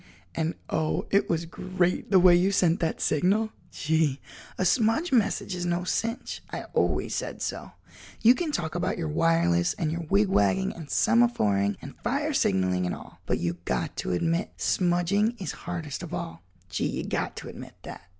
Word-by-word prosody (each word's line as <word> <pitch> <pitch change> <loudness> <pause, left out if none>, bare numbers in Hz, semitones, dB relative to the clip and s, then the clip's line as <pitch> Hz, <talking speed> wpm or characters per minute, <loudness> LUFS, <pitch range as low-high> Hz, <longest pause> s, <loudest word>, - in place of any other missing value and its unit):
"And, 165 +1 -1
oh 155 -1 -1
it 200 - +3
was 165 0 0
great 180 +1 -1
the 190 - +6
way 180 -1 +7
you 185 +3 +3
sent 180 -2 +3
that 165 - -1
signal. 200 +8 +2 0.2
Gee, 155 -3 +1 0.4
a 185 - 0
smudge 225 - +2
message 220 -5 +1
is 180 -1 -3
no 175 0 0
cinch—I 230 +6 -3
always - - +1
said - - -4
so. - - -5 0.5
You 230 +2 +7
can 320 +3 -2
talk 160 - -2
about 175 +2 -1
your 165 -3 -2
wireless 90 - +2
and 155 - -1
your 170 0 -4
wigwagging 100 - +2
and 160 -4 -9
semaphoring 105 - +2
and 140 - -9
fire 285 +5 -1
signalling 95 - +1
and - - -2
all, - - -13
but - - +1
you 85 0 -2
got 65 -1 -2
to - - -2
admit 165 - 0
smudging 185 +5 +1
is 190 - -4
hardest 170 -5 -5
of - - -5
all—gee, 90 +2 -5
you - - -3
got - - -2
to - - -7
admit - - -10
that!" - - -8
170 Hz, 170 wpm, -27 LUFS, 135-200 Hz, 0.5 s, way